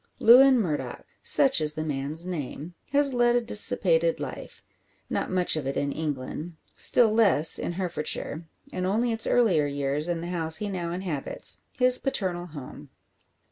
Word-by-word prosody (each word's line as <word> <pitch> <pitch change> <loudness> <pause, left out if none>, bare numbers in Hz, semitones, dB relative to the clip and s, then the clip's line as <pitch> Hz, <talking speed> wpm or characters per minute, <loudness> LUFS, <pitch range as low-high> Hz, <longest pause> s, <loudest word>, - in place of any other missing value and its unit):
Lewin 255 +3 +6
Murdock 160 -9 -4 0.2
such 270 - +4
is 150 0 -1
the 155 - -3
man's 150 +2 -3
name 165 -1 -6 0.2
has 280 -1 +4
led 240 -1 +2
a - - +4
dissipated - - +1
life. - - -8 0.5
Not - - -2
much 185 -2 +1
of 150 -4 -4
it 135 - -3
in 140 0 -1
England; 150 +2 -5 0.2
still 225 -3 +3
less 200 -8 +4
in - - -4
Herefordshire; 170 -2 -4 0.3
and 185 0 -2
only 230 +5 0
its 225 0 +3
earlier 185 -12 +2
years 145 +3 -2
in 170 -1 -2
the 170 - -6
house 165 -3 -2
he 210 +3 -4
now 175 -3 -4
inhabits 175 -6 -3 0.2
his 250 0 +3
paternal 180 -9 -3
home. 145 -6 -11
175 Hz, 160 wpm, -26 LUFS, 150-230 Hz, 0.5 s, Lewin